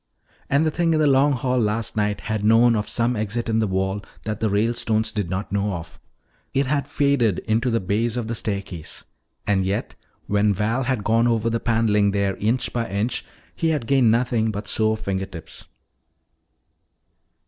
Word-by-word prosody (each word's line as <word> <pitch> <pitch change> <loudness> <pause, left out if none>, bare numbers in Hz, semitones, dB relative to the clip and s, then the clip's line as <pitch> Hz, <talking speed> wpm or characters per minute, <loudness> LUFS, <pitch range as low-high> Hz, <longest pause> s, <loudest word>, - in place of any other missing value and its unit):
And 140 +3 +3
the 155 - +1
thing 165 0 +1
in - - +2
the 155 - +3
Long 140 +1 +4
Hall 125 0 0
last 110 0 -1
night 105 -1 0
had 110 -2 -3
known 115 +2 +5
of 105 -1 -2
some 120 +1 0
exit 110 +2 -2
in 110 0 +1
the 110 - +1
wall 95 +1 -1 0.2
that 105 -1 -3
the 110 - +1
Ralestones 110 +1 +1
did 105 -5 -3
not 95 +2 -3
know 100 0 0
of. 85 -2 -8 0.6
It 135 +1 +2
had 140 +1 -1
faded 140 -9 +2
into 115 +3 +1
the 115 -1 +1
base 110 +5 -1
of 120 - -2
the 115 - -3
staircase. 100 -7 -4 0.4
And 95 -2 +2
yet, 95 +2 -2 0.3
when 105 0 +2
Val 115 +6 0
had 125 -5 -1
gone 115 +2 +3
over 115 -1 +1
the 115 - 0
paneling 110 -3 +2
there 100 -1 0
inch 120 +4 0
by 115 -3 -2
inch, 100 +5 -1 0.3
he 165 - 0
had 150 -7 -1
gained 130 -2 +4
nothing 115 -1 +2
but 105 0 -5
sore 110 0 +1
finger 95 -3 -3
tips. 85 -4 -11
110 Hz, 185 wpm, -23 LUFS, 105-120 Hz, 0.6 s, known